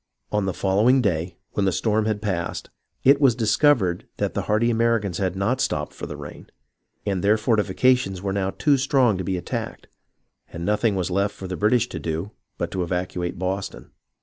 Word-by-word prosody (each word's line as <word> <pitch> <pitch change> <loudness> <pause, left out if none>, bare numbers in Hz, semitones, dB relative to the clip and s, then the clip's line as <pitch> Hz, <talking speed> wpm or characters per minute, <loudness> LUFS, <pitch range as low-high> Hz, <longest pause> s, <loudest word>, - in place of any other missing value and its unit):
On 105 -2 +1
the 95 - -1
following 105 +7 +3
day, 90 -6 -1
when 100 - 0
the - - +3
storm 105 +4 +1
had 105 -1 -2
passed, 85 -5 -3 0.3
it 140 +2 +5
was 130 -5 +5
discovered 110 - +2
that - - -1
the - - -1
hardy 110 +3 +1
Americans 115 -5 +1
had 95 -2 -1
not 110 +7 0
stopped 75 0 -1
for - - -7
the - - -7
rain, - - -10 0.6
and 95 -3 -1
their 105 +2 +4
fortifications 110 -1 +2
were 95 +1 -2
now 95 -1 0
too 140 +7 +2
strong 130 -4 +3
to - - -2
be 95 +1 -1
attacked, 90 - -5 0.7
and 85 0 -5
nothing 105 +1 +1
was 90 -1 -1
left 100 +2 0
for 95 - -7
the 90 - -4
British 115 +5 +2
to - - -5
do 80 +5 -3 0.3
but - - -3
to 95 - -2
evacuate 90 0 -2
Boston. 95 +2 -4
100 Hz, 190 wpm, -23 LUFS, 95-115 Hz, 0.7 s, it